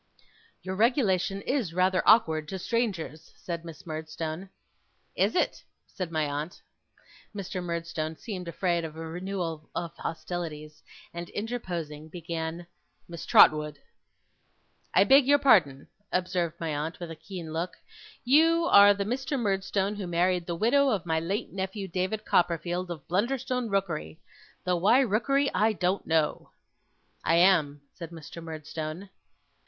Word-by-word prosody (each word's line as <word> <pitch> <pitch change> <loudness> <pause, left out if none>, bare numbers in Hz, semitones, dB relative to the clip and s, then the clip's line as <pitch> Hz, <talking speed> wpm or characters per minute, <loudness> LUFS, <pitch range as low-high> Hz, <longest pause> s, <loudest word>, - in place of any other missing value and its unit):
'Your 185 0 -4
regulation 200 -4 +2
is 235 - -1
rather 185 0 +3
awkward 160 -9 +5
to 190 - -4
strangers,' 190 -7 -2
said 170 -2 -5
Miss 165 -2 -11
Murdstone. 160 +3 -5 0.7
'Is - - +1
it!' - - 0 0.2
said 180 -3 -6
my 155 -2 +1
aunt. 150 +4 -4 0.8
Mr. 190 -2 -4
Murdstone 170 -2 -3
seemed 185 -6 -6
afraid 170 0 0
of 160 -1 -6
a 165 0 -6
renewal 170 -2 -4
of 170 -2 -4
hostilities, 155 -3 -5 0.3
and 170 0 -6
interposing 175 -9 -5
began: 165 0 -5 0.4
'Miss 170 -1 -8
Trotwood!' 150 -1 +6 1.2
'I 190 - +7
beg 270 +4 +6
your 285 +1 +6
pardon,' 160 - +4 0.2
observed 180 -2 -1
my 160 -2 -2
aunt 155 +3 -4
with 175 -2 -6
a - - -6
keen 170 -2 -8
look. 170 +3 -3 0.5
'You 325 +6 +4
are 205 0 +8
the 200 0 -2
Mr. 265 +4 -2
Murdstone 195 -1 0
who 195 -3 -4
married 175 0 +1
the 170 - -2
widow 270 +9 +3
of 200 -8 -1
my 160 -1 +1
late 190 +6 -3
nephew, 195 +1 -4
David 190 +4 -2
Copperfield, 175 +1 +1
of 165 -5 -7
Blunderstone 250 +5 -1
Rookery! 185 -5 -2 0.4
Though 180 -1 +1
why 210 +9 +5
Rookery, 275 +5 +1
I 215 +4 +3
don't 185 +1 -1
know!' 160 -2 +1 0.7
'I 165 - +3
am,' 170 -5 +4
said 170 -2 -8
Mr. 170 0 -10
Murdstone. 160 +3 -6
180 Hz, 140 wpm, -28 LUFS, 160-200 Hz, 1.2 s, are